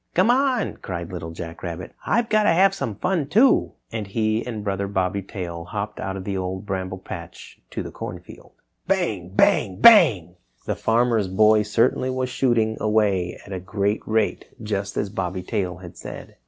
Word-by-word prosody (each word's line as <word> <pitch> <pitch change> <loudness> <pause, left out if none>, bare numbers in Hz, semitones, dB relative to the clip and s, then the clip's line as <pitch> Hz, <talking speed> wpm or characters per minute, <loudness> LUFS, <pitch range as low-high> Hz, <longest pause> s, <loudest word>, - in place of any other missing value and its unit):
"Come 235 - +5
on!" 255 -5 +1
cried 85 -2 -6
Little 85 -2 -5
Jack 80 0 -8
Rabbit, 85 0 -6
"I've 235 +1 +2
got 215 -1 +3
to - - +5
have 190 +4 +5
some 115 - -3
fun, 175 - -1
too!" 235 - +4 0.2
And 110 -3 -4
he 110 +2 0
and 110 -4 -5
Brother 100 -1 -2
Bobby 95 0 -1
Tail 85 -3 -6
hopped 105 +3 -5
out 95 0 -3
of 95 - -6
the 100 0 -3
Old 95 +1 -3
Bramble 95 -2 -3
Patch 85 -2 -10
to - - -4
the - - -7
Corn - - -6
Field. - - -15 0.3
Bang! 165 - 0
Bang! 95 -3 +3
Bang! 110 - +6 0.3
The - - -1
Farmer's 115 -3 +2
Boy 105 +3 +4
certainly 115 +4 +1
was 130 0 -2
shooting 120 -4 +1
away 105 -5 +1
at 100 - -8
a 95 - -3
great 100 +3 -1
rate, 110 -1 0 0.2
just 100 -2 -3
as 100 - -1
Bobby 90 -2 -3
Tail 90 -2 -2
had 90 -2 -11
said. - - -9
105 Hz, 180 wpm, -23 LUFS, 95-120 Hz, 0.3 s, Bang